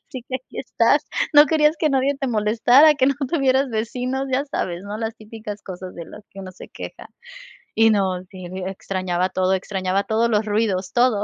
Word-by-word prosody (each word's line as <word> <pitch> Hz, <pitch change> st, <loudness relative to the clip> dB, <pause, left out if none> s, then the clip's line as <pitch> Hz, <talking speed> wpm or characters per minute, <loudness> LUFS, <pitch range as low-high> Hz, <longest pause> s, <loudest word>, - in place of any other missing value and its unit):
así 255 Hz, -3 st, -8 dB
que 260 Hz, -, -5 dB
aquí 260 Hz, -, -13 dB
estás, -, -, +1 dB, 0.3 s
no 295 Hz, 0 st, +8 dB
querías 305 Hz, +1 st, +3 dB
que 305 Hz, -1 st, +1 dB
nadie 275 Hz, +1 st, +1 dB
te 270 Hz, -, -2 dB
molestara, 240 Hz, +7 st, +4 dB
que 260 Hz, -2 st, +3 dB
no 275 Hz, -, +2 dB
tuvieras 270 Hz, -3 st, +1 dB
vecinos, 250 Hz, +4 st, -2 dB
ya 270 Hz, +2 st, +1 dB
sabes, 175 Hz, -9 st, -3 dB
¿no?, 205 Hz, +2 st, -6 dB
las 225 Hz, 0 st, -3 dB
típicas 215 Hz, -1 st, -9 dB
cosas 185 Hz, -1 st, -8 dB
de 170 Hz, -, -8 dB
las 210 Hz, -, -13 dB
que 195 Hz, -, -11 dB
uno 185 Hz, -, -8 dB
se 185 Hz, -, -12 dB
queja. -, -, -9 dB, 0.7 s
Y 225 Hz, 0 st, +5 dB
no, 190 Hz, -3 st, 0 dB
sí, 185 Hz, -2 st, -10 dB
e 185 Hz, +1 st, -5 dB
extrañaba 185 Hz, -1 st, -2 dB
todo, 185 Hz, 0 st, 0 dB
extrañaba 190 Hz, 0 st, -1 dB
todos 230 Hz, +2 st, +1 dB
los 215 Hz, -1 st, +1 dB
ruidos, 205 Hz, -3 st, -1 dB
todo. 240 Hz, -4 st, +2 dB
220 Hz, 200 wpm, -21 LUFS, 190-260 Hz, 0.7 s, no